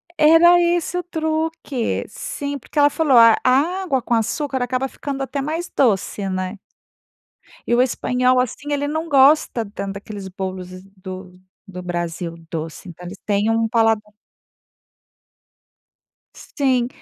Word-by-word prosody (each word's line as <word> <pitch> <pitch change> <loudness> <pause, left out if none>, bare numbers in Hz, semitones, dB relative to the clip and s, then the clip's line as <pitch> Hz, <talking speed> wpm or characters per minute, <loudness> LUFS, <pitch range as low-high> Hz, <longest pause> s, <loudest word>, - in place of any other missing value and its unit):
Era 335 +3 +6
esse 345 0 0
o 355 - -2
truque, 315 -6 -2
sim, 285 -14 -5
porque 295 - -4
ela 290 0 +6
falou: 295 -5 +3
"A 230 -1 +8
água 290 +3 +1
com 240 - -2
açúcar 260 +4 -1
acaba 255 +2 -1
ficando 275 0 -6
até 275 +1 -3
mais 320 +5 -3
doce, 205 -4 +1
né." 185 +1 -3 1.1
E 240 - +4
o 245 - +4
espanhol, 255 0 +1
assim, 255 +4 -3
ele 285 0 0
não 315 +2 -3
gosta 275 -4 +4
tanto 200 -1 -5
daqueles 200 -1 -8
bolos 185 -1 -5 0.3
do 185 -1 -9 0.3
do 180 -1 -8
Brasil 175 -1 -4 0.2
doce. 160 +2 -6
Então 175 +1 -11
eles 180 +3 -8
tem 205 +1 +1
um 225 0 +1
paladar 225 -2 +1 2.3
Sim, 255 -4 0
250 Hz, 135 wpm, -21 LUFS, 200-290 Hz, 2.3 s, A